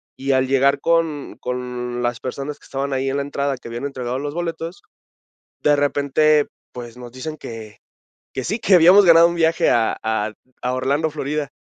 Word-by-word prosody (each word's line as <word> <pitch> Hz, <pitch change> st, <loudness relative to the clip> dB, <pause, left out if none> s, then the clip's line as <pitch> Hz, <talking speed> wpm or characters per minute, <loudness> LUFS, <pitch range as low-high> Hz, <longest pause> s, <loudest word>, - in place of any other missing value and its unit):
y 135 Hz, +1 st, -2 dB
al 130 Hz, 0 st, +2 dB
llegar 135 Hz, +1 st, +3 dB
con 165 Hz, -3 st, 0 dB
con 125 Hz, -1 st, -4 dB
las 120 Hz, -1 st, -1 dB
personas 140 Hz, +3 st, -5 dB
que -, -, -27 dB
estaban 140 Hz, +1 st, -3 dB
ahí 135 Hz, 0 st, -1 dB
en 140 Hz, -, -1 dB
la -, -, 0 dB
entrada, 140 Hz, -1 st, -2 dB
que 125 Hz, -, -12 dB
habían 120 Hz, +4 st, -5 dB
entregado 130 Hz, -2 st, -3 dB
los 145 Hz, +1 st, -4 dB
boletos, 165 Hz, 0 st, -4 dB, 0.8 s
de 145 Hz, 0 st, +4 dB
repente, 145 Hz, +1 st, +2 dB, 0.2 s
pues, 120 Hz, -1 st, -9 dB
nos 120 Hz, -1 st, -10 dB
dicen 155 Hz, +5 st, -6 dB
que 110 Hz, -6 st, -9 dB, 0.5 s
que 130 Hz, -, -4 dB
sí, 215 Hz, +5 st, -2 dB
que 195 Hz, -, +4 dB
habíamos 180 Hz, +4 st, +7 dB
ganado 170 Hz, 0 st, +8 dB
un 170 Hz, -, -3 dB
viaje 165 Hz, 0 st, +2 dB
a 115 Hz, -1 st, +2 dB
a 110 Hz, -1 st, -1 dB, 0.3 s
a 125 Hz, 0 st, -1 dB
Orlando, 140 Hz, +5 st, 0 dB
Florida. 150 Hz, -1 st, -3 dB
140 Hz, 185 wpm, -21 LUFS, 125-155 Hz, 0.8 s, ganado